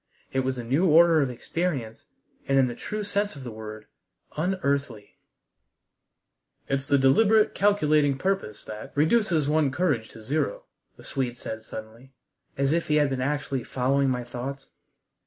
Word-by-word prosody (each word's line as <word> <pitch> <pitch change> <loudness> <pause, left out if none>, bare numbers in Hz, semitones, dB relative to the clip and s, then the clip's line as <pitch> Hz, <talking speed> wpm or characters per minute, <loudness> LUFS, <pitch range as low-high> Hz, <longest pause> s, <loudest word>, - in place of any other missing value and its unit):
It 135 - +1
was 130 0 -1
a 120 - -4
new 140 +11 +2
order 165 0 +6
of 135 - 0
experience, 125 -3 -3 0.4
and 135 - +2
in 135 - +5
the 120 - -3
true 210 - -5
sense 205 -2 -1
of 140 - -9
the 120 - -6
word 110 0 -8 0.5
unearthly. 140 - -2 1.5
"It's 135 0 -1
the 140 - +4
deliberate, 210 +11 +4
calculating 155 -9 +3
purpose 190 - -2
that 105 0 -8
reduces 160 -1 +2
one's 150 -3 +1
courage 145 -12 0
to 110 - -13
zero," 155 - -1 0.3
the - - -14
Swede 125 -3 -3
said 110 -2 -6
suddenly, 110 +4 -10 0.4
as 140 0 +1
if 170 +1 0
he 150 - +2
had 145 -2 +3
been 130 -1 -2
actually 140 -2 -2
following 135 +3 +1
my 125 -1 -1
thoughts. 130 +3 -7
140 Hz, 155 wpm, -26 LUFS, 125-160 Hz, 1.5 s, order